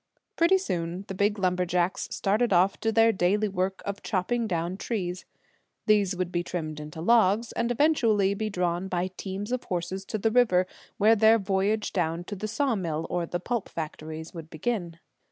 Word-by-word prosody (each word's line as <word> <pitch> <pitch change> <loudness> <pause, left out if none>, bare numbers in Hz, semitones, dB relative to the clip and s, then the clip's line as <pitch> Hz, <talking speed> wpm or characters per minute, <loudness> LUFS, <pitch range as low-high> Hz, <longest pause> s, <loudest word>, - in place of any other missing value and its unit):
Pretty 340 +3 +4
soon 180 - -3
the - - -5
big 205 +2 +1
lumberjacks 180 -1 0
started 215 +4 +1
off 185 +2 +3
to 225 - 0
their 225 +1 +5
daily 205 +2 +1
work 190 -1 -2
of 200 0 -4
chopping 225 +4 -1
down 175 -1 -2
trees. 185 -4 -3 0.6
These 205 -3 +3
would 180 -1 -2
be 175 - 0
trimmed 155 -3 -4
into 150 +1 -8
logs, 220 +2 +3
and 235 0 -1
eventually 230 -7 +3
be 215 +2 -2
drawn 180 -1 -1
by 185 0 -2
teams 195 +4 -5
of 255 -1 -2
horses 180 +2 -3
to 215 - -3
the 220 +2 +1
river, 220 -7 +4 0.3
where 220 +3 +5
their 220 +1 +6
voyage 200 +1 0
down 170 -2 -1
to 205 - -6
the 215 +2 -4
sawmills 195 - -1
or 175 -1 -1
the 175 - -3
pulp 235 +3 -3
factories 160 0 -6
would 165 -2 -8
begin. 170 0 -3
190 Hz, 175 wpm, -27 LUFS, 175-220 Hz, 0.6 s, their